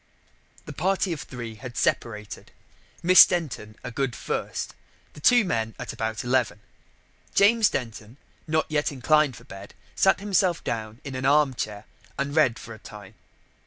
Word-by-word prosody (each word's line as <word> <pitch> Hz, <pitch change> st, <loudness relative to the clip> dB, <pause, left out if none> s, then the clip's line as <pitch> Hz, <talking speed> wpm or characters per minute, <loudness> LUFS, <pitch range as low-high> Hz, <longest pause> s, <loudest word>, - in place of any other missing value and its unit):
The -, -, -8 dB
party 190 Hz, +1 st, 0 dB
of 155 Hz, -, -6 dB
three 120 Hz, -3 st, -7 dB
had 120 Hz, +3 st, -9 dB
separated. 105 Hz, -3 st, -2 dB, 0.5 s
Miss 185 Hz, +2 st, +10 dB
Denton 140 Hz, -11 st, -3 dB
a 125 Hz, -, -6 dB
good 135 Hz, 0 st, -2 dB
first, -, -, -4 dB, 0.4 s
the -, -, -12 dB
two 240 Hz, +8 st, +5 dB
men 115 Hz, -, -2 dB
at -, -, -6 dB
about 110 Hz, -1 st, -3 dB
eleven. 125 Hz, -4 st, 0 dB, 0.8 s
James 215 Hz, +1 st, +5 dB
Denton, 115 Hz, 0 st, -6 dB, 0.3 s
not 155 Hz, 0 st, +1 dB
yet 150 Hz, -1 st, 0 dB
inclined 145 Hz, 0 st, +2 dB
for 115 Hz, -, -13 dB
bed, 100 Hz, -5 st, -11 dB, 0.2 s
sat 190 Hz, -, +3 dB
him 200 Hz, 0 st, -7 dB, 0.3 s
down 110 Hz, +1 st, -4 dB
in 140 Hz, -, -7 dB
an 130 Hz, 0 st, -3 dB
arm 145 Hz, -1 st, +4 dB
chair 105 Hz, -3 st, -5 dB, 0.3 s
and 140 Hz, +1 st, -2 dB
read 130 Hz, -7 st, +3 dB
for 115 Hz, -, -9 dB
a 110 Hz, -, -12 dB
time. 105 Hz, -2 st, -12 dB
130 Hz, 160 wpm, -25 LUFS, 110-155 Hz, 0.8 s, Miss